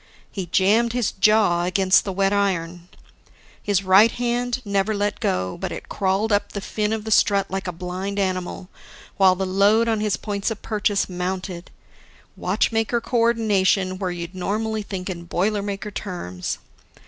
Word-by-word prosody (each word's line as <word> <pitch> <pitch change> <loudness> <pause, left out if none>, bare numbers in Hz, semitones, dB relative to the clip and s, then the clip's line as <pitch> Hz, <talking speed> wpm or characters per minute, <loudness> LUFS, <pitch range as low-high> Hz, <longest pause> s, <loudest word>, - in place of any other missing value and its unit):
He 190 -3 -5
jammed 215 +7 +3
his 245 -4 0
jaw 200 -4 +3
against 185 +1 +3
the 195 - -2
wet 195 +1 +1
iron. 180 -3 -1 0.7
His 200 -2 0
right 195 +4 +6
hand 245 +1 -1
never 200 +1 0
let 205 0 -1
go, 90 0 -1
but - - -3
it - - -8
crawled 195 +3 0
up 205 0 +1
the 200 - -3
fin 210 +1 -2
of 220 -1 -2
the 220 - -5
strut 200 -2 +3
like 190 0 -3
a - - -1
blind 185 +3 -5
animal, 185 -1 -2 0.5
while 190 -2 +5
the 190 +1 -2
load 200 +5 +3
on 225 -2 +1
his 210 -1 0
points 200 -1 -2
of 220 -2 -6
purchase 205 -2 0
mounted 180 0 -4 0.7
watchmaker 225 +1 0
co 240 +1 -2
ordination 200 -5 +2
where 190 -2 -1
you'd 175 0 -6
normally 215 +4 -2
think 195 -3 -6
in 170 -3 -6
boilermaker 200 +2 -2
terms. 90 - -5
195 Hz, 160 wpm, -22 LUFS, 185-215 Hz, 0.7 s, right